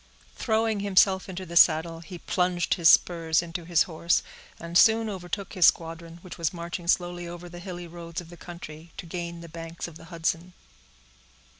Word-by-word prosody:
Throwing 220 -2 0
himself 195 -1 +3
into 185 0 -6
the 170 -1 -9
saddle, 165 0 +5
he 175 +2 -9
plunged 180 0 0
his 165 -2 +5
spurs 165 -1 +4
into 170 0 -6
his 170 -1 +3
horse, 170 0 0 0.4
and 170 +1 -8
soon 225 +4 +6
overtook 190 +1 -5
his 185 -4 +6
squadron, 165 0 -1
which 185 - -10
was 165 -2 0
marching 170 0 -6
slowly 175 0 0
over 175 +1 -8
the 175 0 -10
hilly 175 -1 -7
roads 170 -1 -7
of 175 -1 -11
the - - -10
county, 165 -1 -10
to 185 - -7
gain 170 0 -6
the 170 - -9
banks 165 +1 -7
of 165 -2 -11
the - - -14
Hudson. 170 +1 -3
170 Hz, 180 wpm, -27 LUFS, 165-180 Hz, 0.4 s, soon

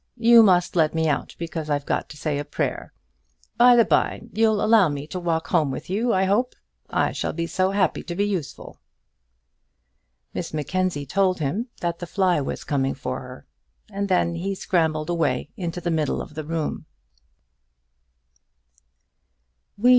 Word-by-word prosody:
You 235 0 +7
must 180 -5 +3
let 160 -2 +2
me 160 0 +1
out, 145 - -2
because 165 -2 -5
I've 145 -1 -1
got - - -2
to 150 - -11
say 150 -2 -2
a - - -2
prayer. 145 - -3 0.7
By 245 +1 +7
the 235 -2 +5
bye, - - +1
you'll 220 -1 +2
allow 215 -6 +5
me 145 0 -4
to 180 +4 -5
walk 165 -2 -1
home 160 -5 +2
with 135 +6 -6
you, 230 +5 +1
I 190 -2 +2
hope. 210 +7 +1 0.3
I - - +1
shall - - -3
be 170 +1 -2
so 185 +2 0
happy 195 -3 +1
to 170 - -5
be 200 +3 +1
useful." 185 -8 -5 1.5
Miss - - -4
Mackenzie 155 0 -1
told 190 +4 +1
him 170 - -2
that 170 -1 -2
the 175 - -6
fly 180 -2 +1
was 135 - -4
coming 135 -2 -1
for 130 -2 -4
her, 125 - -11 0.5
and 200 0 -3
then 180 -2 +2
he 190 +4 -3
scrambled 160 -3 0
away 150 -5 0
into 175 -2 -4
the 175 0 -2
middle 155 -2 0
of - - -7
the 155 -1 -6
room. 160 -1 -3
170 Hz, 165 wpm, -24 LUFS, 155-195 Hz, 1.5 s, You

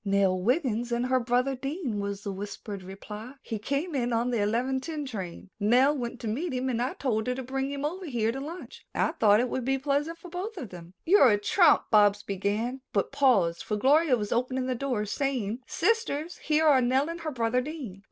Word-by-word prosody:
"Nell 195 -2 +2
Wiggin 240 - +1
and 240 +1 0
her 255 0 +2
brother 250 +2 +1
Dean," 270 - -3
was 200 0 -4
the 200 - -3
whispered 200 0 -6
reply. 210 +6 -9
"He 220 - -4
came 280 - -2
in 245 -3 0
on 235 +2 +1
the 235 -3 +1
eleven 245 +6 0
ten 305 0 -4
train. 195 -6 -7
Nell 250 +8 +4
went 245 -2 -4
to 230 - -4
meet 275 +9 -2
him 255 +1 -1
and 240 -2 -1
I 255 - -1
told 220 -5 -1
her 250 - 0
to 260 - -5
bring 270 +2 -2
him 280 0 -3
over 360 +4 -4
here 230 -5 0
to 265 - -5
lunch. 305 -2 -8
I - - +2
thought 210 -1 +4
it 250 - +1
would 255 +1 -3
be 270 +2 +1
pleasant 290 +4 -1
for 350 +2 -12
both 375 +6 -5
of 240 - -6
them." 175 0 -11
"You're 340 -7 +6
a 205 - +4
trump," 205 - +3
Bobs 205 -1 +5
began, 210 +6 -2
but 200 - 0
paused, 235 -12 +3
for 210 - -2
Gloria 280 +3 +4
was 210 -2 -4
opening 255 +2 0
the 255 - 0
door, 245 -4 -2
saying, 245 -2 -2
"Sisters, 350 -8 0
here 310 +1 +1
are 280 -4 +6
Nell 260 +4 +2
and 335 +1 -5
her 320 - -3
brother 240 -1 +1
Dean." 260 - -7
250 Hz, 220 wpm, -28 LUFS, 210-280 Hz, -, You're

